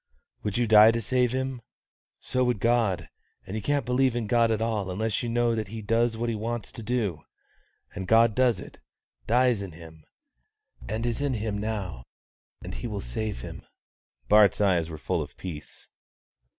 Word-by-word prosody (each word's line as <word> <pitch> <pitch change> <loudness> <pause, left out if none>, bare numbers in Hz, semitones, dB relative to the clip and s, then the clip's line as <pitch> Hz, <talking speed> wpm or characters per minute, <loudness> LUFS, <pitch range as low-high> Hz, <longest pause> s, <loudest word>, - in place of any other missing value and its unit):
"Would 105 0 -2
you 120 - +2
die 110 0 +8
to 115 +1 +1
save 125 +1 +1
him? 130 -1 -2 0.6
So 130 0 0
would 125 -4 0
God; 110 -7 +1 0.4
and 95 - -6
you 110 - -2
can't 145 +5 0
believe 125 0 +2
in 120 -2 -1
God 115 +1 +3
at 110 -1 +1
all 110 -4 -1
unless 110 +3 -1
you 120 - -3
know 120 0 +2
that 110 -2 -2
He 110 +2 -7
does 115 +2 +1
what 120 +1 -2
He 115 - 0
wants 115 +1 -4
to - - -8
do. 105 -8 -1 0.7
And 95 -2 -5
God 115 0 +5
does 125 -5 +2
it; - - -11 0.5
dies 120 -2 +3
in 95 -4 -7
him, 80 -1 -13 0.9
and 110 +2 -2
is 120 +3 -1
in 140 -3 0
him 110 -1 -2
now; 100 - -4 0.6
and - - -6
He - - -5
will - - -4
save 105 - -4
him." - - -8 0.7
Bart's 105 -2 +5
eyes 90 -5 +2
were 80 - -6
full - - -1
of - - -8
peace. 80 -5 -8
110 Hz, 185 wpm, -27 LUFS, 100-120 Hz, 0.9 s, die